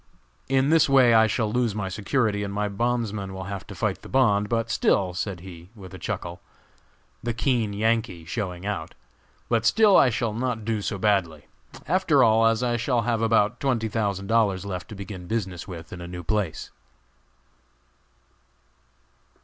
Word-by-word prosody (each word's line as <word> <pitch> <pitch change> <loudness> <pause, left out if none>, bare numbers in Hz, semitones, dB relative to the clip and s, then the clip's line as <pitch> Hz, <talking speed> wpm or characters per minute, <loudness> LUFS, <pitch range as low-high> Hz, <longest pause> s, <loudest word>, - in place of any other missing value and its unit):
In 135 +2 +2
this 160 -3 +4
way 130 -3 +6
I 110 0 +6
shall 110 0 -1
lose 120 -4 0
my 105 -2 -2
security, 105 +2 0
and 100 -1 -3
my 105 +1 -1
bondsmen 105 -2 -2
will 95 - -5
have 100 0 -6
to - - -9
fight - - -2
the - - -12
bond; 105 -6 +2
but 115 -1 -1
still," 95 -4 +2
said 90 0 -4
he, 85 -1 -11
with 95 -3 -12
a 95 - -9
chuckle, 90 -2 -5 0.8
the 120 -1 -3
keen 120 -4 0
Yankee 110 -4 -1
showing 90 0 -4
out, 100 -6 -4 0.5
"but 115 -2 +1
still 215 -2 +5
I 130 - +6
shall 115 -1 -1
not 115 -2 -3
do 110 -2 -1
so 100 0 -3
badly, 95 -7 0 0.4
after 160 -6 +3
all, 115 0 +5
as 115 +2 +1
I 120 -1 +1
shall 120 0 0
have 115 -1 0
about 115 +1 +2
twenty 120 -5 0
thousand 100 -3 -2
dollars 100 -3 +1
left 90 -3 -5
to 110 - -8
begin 95 -2 -8
business 95 -5 -3
with 85 -3 -9
in 90 - -8
a 85 - -7
new 90 0 -7
place." 105 -3 -2
105 Hz, 175 wpm, -25 LUFS, 95-115 Hz, 0.8 s, way